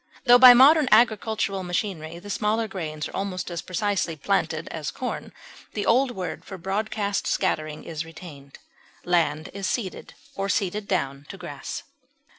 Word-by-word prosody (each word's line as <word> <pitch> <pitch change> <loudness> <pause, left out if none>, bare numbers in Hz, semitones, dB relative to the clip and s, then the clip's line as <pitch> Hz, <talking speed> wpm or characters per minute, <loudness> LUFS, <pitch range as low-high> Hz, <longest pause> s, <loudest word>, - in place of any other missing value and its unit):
Tho 245 0 +8
by 250 -1 +11
modern 290 +3 +7
agricultural 215 -3 +3
machinery 175 -3 -3
the 205 +4 -8
smaller 220 +2 0
grains 155 -6 -5
are - - -10
almost 185 -2 -3
as 170 -1 -4
precisely 185 -3 -1
planted 160 -1 -1
as 155 -3 -4
corn, 255 - -5 0.4
the 205 - -2
old 260 +3 +4
word 190 -7 -5
for 190 - -8
broadcast 200 +2 -2
scattering 155 0 -1
is 160 -2 -5
retained. 155 -4 -12 0.5
Land 160 -3 +1
is 195 -1 -3
seeded 200 -7 -4 0.2
or 195 0 -3
seeded 200 0 -1
down 140 -7 -2
to 195 - -8
grass. 145 -7 -7
190 Hz, 150 wpm, -25 LUFS, 165-215 Hz, 0.5 s, by